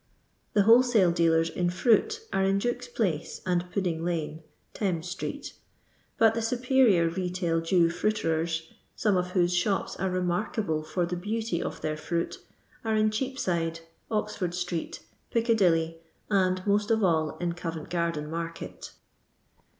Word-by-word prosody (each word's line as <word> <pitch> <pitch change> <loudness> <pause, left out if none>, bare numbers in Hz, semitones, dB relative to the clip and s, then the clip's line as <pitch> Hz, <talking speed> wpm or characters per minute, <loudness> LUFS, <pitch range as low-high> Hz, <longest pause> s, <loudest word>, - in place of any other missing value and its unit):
The 205 - +4
wholesale 225 -4 +5
dealers 165 -1 +3
in 175 -1 0
fruit 250 - +2
are 195 - +2
in 195 +1 +2
Duke's 245 +4 -2
placc 190 -10 -2
and 180 -1 0
Puddinghine 165 -4 -2 0.3
(Thames 180 -5 -1
street), 180 +1 -5 0.6
but 225 -1 +5
the 230 - -1
superior 240 -6 +3
retail 175 -1 -1
Jew 170 0 +3
fruiterers 165 -4 -1 0.2
— - - -39
some 210 -3 +2
of 180 0 -1
whose 175 -1 +2
shops 190 +3 0
are 190 +1 -1
remarkable 180 -1 -1
for 155 +3 -1
the 175 +1 -3
beauty 210 0 -2
of - - -5
their 155 0 -2
fruit 170 +2 -3 0.2
— - - -32
are 220 -1 0
in 215 0 +3
Cheapside, 180 -10 -2 0.3
Oxford 210 -5 -2
street, 175 -2 -3 0.3
Ticca 230 0 +2
dilly, 165 -5 +2 0.3
and 185 -2 +2
most 205 0 +2
of 220 -1 +2
all 160 -4 +1
in 175 -1 -2
Covcnt 165 -2 -6
gardcn 170 -3 -1
market. 165 +1 -6
180 Hz, 145 wpm, -28 LUFS, 165-215 Hz, 0.6 s, wholesale